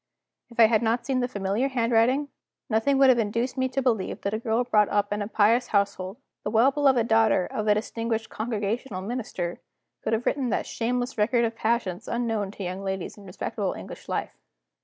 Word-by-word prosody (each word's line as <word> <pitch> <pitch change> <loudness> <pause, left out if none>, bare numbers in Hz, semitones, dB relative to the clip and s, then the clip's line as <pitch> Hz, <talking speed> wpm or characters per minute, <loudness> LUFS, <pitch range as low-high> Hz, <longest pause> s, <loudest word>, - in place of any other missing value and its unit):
If 235 - -12
I 230 - +9
had 220 -1 +3
not 235 +1 0
seen 265 -1 0
the 245 - 0
familiar 205 +2 -1
handwriting, 250 +2 +2 0.4
nothing 225 +6 +2
would 270 -1 +6
have 245 -2 +5
induced 230 +4 -1
me 260 -1 0
to 265 +1 -1
believe 225 -7 0
that 200 - -2
a 215 - -1
girl 230 +1 +1
brought 210 -4 +3
up 205 0 +1
in 210 - -2
a 205 - -2
pious 225 +3 +3
household, 200 -1 0 0.3
the - - -2
well 230 +5 +4
beloved 265 -5 +3
daughter 225 -5 +3
of 215 +3 -4
a 210 - +5
distinguished 225 +1 -2
Congregational 215 -1 -3
Minister, 200 -6 -4 0.4
could 220 - -1
have 225 +2 0
written 265 -4 0
that - - 0
shameless 245 +1 -2
record 235 +3 +3
of 225 0 -3
passions 220 -6 -1
unknown 225 -4 -1
to 200 0 -8
young 185 +2 -4
ladies 190 -2 -4
in 205 - -14
respectable 185 - -3
English - - -10
life. - - -2
225 Hz, 200 wpm, -26 LUFS, 205-245 Hz, 0.4 s, I